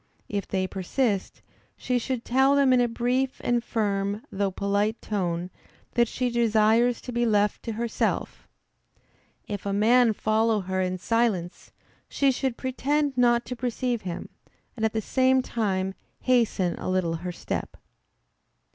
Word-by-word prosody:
If 200 -1 -3
they 190 -1 0
persist, 195 +3 -2 0.3
she 250 -1 0
should 245 0 -3
tell 265 +3 +4
them 275 -2 +4
in 250 - +4
a 240 - +3
brief 250 +3 -1
and 240 -1 +1
firm, 205 -2 -1
though 200 0 0
polite 200 +3 0
tone, 180 -3 -2 0.4
that 235 -1 +3
she 250 +1 -2
desires 230 +1 +3
to 250 - -7
be 240 0 0
left 210 -3 +2
to 230 - -3
herself. 230 +1 -2 1.0
If 205 -2 -4
a 200 - -2
man 230 +3 +4
follow 220 0 +1
her 185 0 -2
in 185 0 -1
silence, 200 -4 -1 0.4
she 275 -1 +2
should 260 -1 -2
pretend 275 +2 0
not 240 -1 +3
to 250 - -5
perceive 245 -1 -2
him, 175 -2 -6 0.5
and 225 - -5
at 220 - +1
the 220 - 0
same 260 +3 +2
time 190 -5 -1 0.3
hasten 225 -8 +1
a - - -4
little 180 -3 0
her 180 +2 -5
step. - - -5
225 Hz, 150 wpm, -26 LUFS, 200-245 Hz, 1.0 s, tell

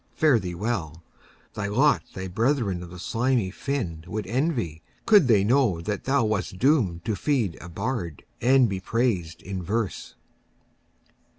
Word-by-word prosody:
Fare 150 -7 +4
thee 90 -3 -5
well! 85 -6 -3 0.5
Thy 105 -1 -3
lot 135 +9 +3
thy 95 0 -4
brethern 110 -2 0
of 90 - -8
the 90 - -10
slimy 115 +1 0
fin 95 - -3
Would 105 +2 -4
envy, 115 - -1 0.2
could 205 - +6
they 105 -5 +5
know 115 -5 +3
that 100 +4 -4
thou 135 -3 +2
wast 105 -2 -2
doom'd 105 - +2
To 110 - 0
feed 120 - 0
a 90 - -9
bard, 90 - -4 0.2
and 130 +1 +5
to - - 0
be 95 -1 -2
prais'd 95 -6 -1
in 95 -1 -4
verse. 105 +3 -3
105 Hz, 160 wpm, -25 LUFS, 90-125 Hz, 0.5 s, could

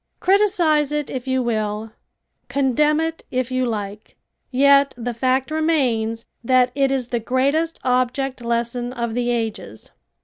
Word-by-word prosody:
Criticise 355 -7 +3
it 295 -1 -2
if 260 0 -5
you 260 -1 +1
will, 215 -1 -2 0.6
condemn 280 +4 +2
it 325 0 -3
if 255 0 -2
you 255 0 0
like, 210 -2 -5 0.3
yet 280 +1 +4
the 240 0 -3
fact 260 +4 0
remains 250 -8 0 0.2
that 255 +1 +3
it 275 -1 +2
is 260 -3 -1
the 240 - -1
greatest 280 +8 0
object 255 +1 0
lesson 235 +1 -2
of 235 -2 -3
the 245 0 -1
ages. 220 - -4
255 Hz, 140 wpm, -21 LUFS, 235-280 Hz, 0.6 s, yet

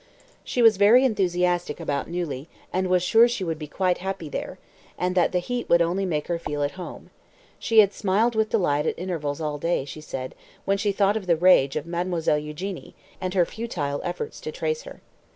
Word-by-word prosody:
She 245 - 0
was 225 -3 +6
very 225 +6 +6
enthusiastic 180 - 0
about 145 +1 -2
Neuilly, 165 -5 -4 0.2
and 185 0 0
was 180 -1 +2
sure 225 +6 +6
she 235 -5 -3
would 165 -3 -3
be 150 - -6
quite 180 +3 0
happy 190 -4 -4
there, - - -5 0.4
and 180 0 0
that 180 -1 +2
the 180 - +1
heat 240 +7 -3
would 170 - +6
only 185 +3 -1
make 150 -4 -1
her 170 -1 -1
feel 145 -3 -3
at 145 - 0
home. 185 -1 -9 0.5
She 225 -2 +5
had 200 -1 +1
smiled 215 +4 +1
with 220 -1 +1
delight 150 -8 +1
at - - -1
intervals 165 -5 -3
all 150 -2 -3
day, 165 -3 0
she 155 +2 -9
said, 130 -4 -6 0.3
when 195 0 +1
she 205 0 +1
thought 200 +1 +2
of 195 -4 -7
the 170 - +4
rage 160 -6 +5
of - - -2
Mademoiselle 170 -3 0
Eugénie, 150 +6 -7 0.3
and 185 0 -3
her 180 -2 +4
futile 155 -12 -4
efforts 310 - -5
to - - -5
trace 470 0 -2
her. - - -11
180 Hz, 205 wpm, -25 LUFS, 155-200 Hz, 0.5 s, was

